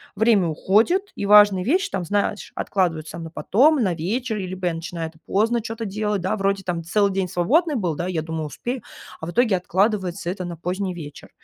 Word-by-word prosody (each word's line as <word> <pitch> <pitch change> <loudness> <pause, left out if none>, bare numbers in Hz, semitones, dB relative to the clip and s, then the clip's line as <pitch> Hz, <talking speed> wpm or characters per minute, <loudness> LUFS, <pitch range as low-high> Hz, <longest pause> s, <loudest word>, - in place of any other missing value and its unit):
время 215 -4 +3
уходит, 225 - +2
и - - -3
важные 205 -3 +7
вещи, 375 - +1
там, 180 - -2
знаешь, 205 +2 -1
откладываются 165 -4 -1
на 165 -1 -7
потом, 275 - +3
на 185 -4 +1
вечер, 215 +7 -2
либо 185 -1 -5
я 170 - 0
начинаю 165 0 -5
это 160 - -22
поздно 230 +4 +1
чё-то 225 0 -5
делать, 210 -1 -2
да, 190 +4 0
вроде 195 -1 0
там 175 -2 -3
целый 200 +4 +2
день 190 -1 0
свободный 290 - +2
был, 180 -9 0
да, 175 +3 -3
и - - -3
я 160 -1 -1
думаю: 160 -1 -4
"Успею", 245 - -5 0.4
а 160 - -5
в - - -4
итоге 230 -3 +3
откладывается 185 -1 0
это 185 -2 -5
на 170 -2 -6
поздний 180 +2 -3
вечер. 150 -4 -9
190 Hz, 205 wpm, -23 LUFS, 175-215 Hz, 0.4 s, важные